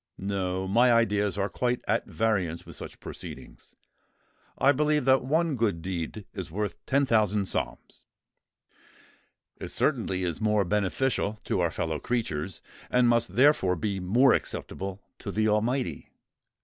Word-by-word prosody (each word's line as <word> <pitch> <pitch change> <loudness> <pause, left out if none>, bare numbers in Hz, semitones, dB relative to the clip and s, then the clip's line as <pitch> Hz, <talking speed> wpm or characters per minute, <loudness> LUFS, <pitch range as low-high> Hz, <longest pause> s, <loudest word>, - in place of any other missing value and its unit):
No—my 95 +4 +1
ideas 105 -4 +2
are 100 0 +1
quite 125 +6 -1
at 115 - +1
variance 95 -7 -1
with - - -10
such - - -8
proceedings. - - -10 0.8
I 140 - +5
believe 150 0 +1
that 130 -1 +4
one 155 +3 +1
good 105 -9 0
deed 95 +2 -4
is 95 -3 -6
worth 100 +1 -4
ten 140 +1 +3
thousand 105 -4 +2
psalms. 60 -8 -5 1.5
It - - -7
certainly 95 -1 0
is 85 0 -3
more 105 -2 +2
beneficial 105 +3 0
to - - -1
our 85 -1 +2
fellow 80 -1 -2
creatures, 95 -8 -2 0.3
and 125 -1 +4
must 115 -5 +2
therefore 125 -8 +4
be 100 +2 -2
more 120 +9 +4
acceptable 95 0 -4 0.2
to - - -6
the 110 0 +1
Almighty. 120 +5 0
105 Hz, 135 wpm, -27 LUFS, 95-120 Hz, 1.5 s, I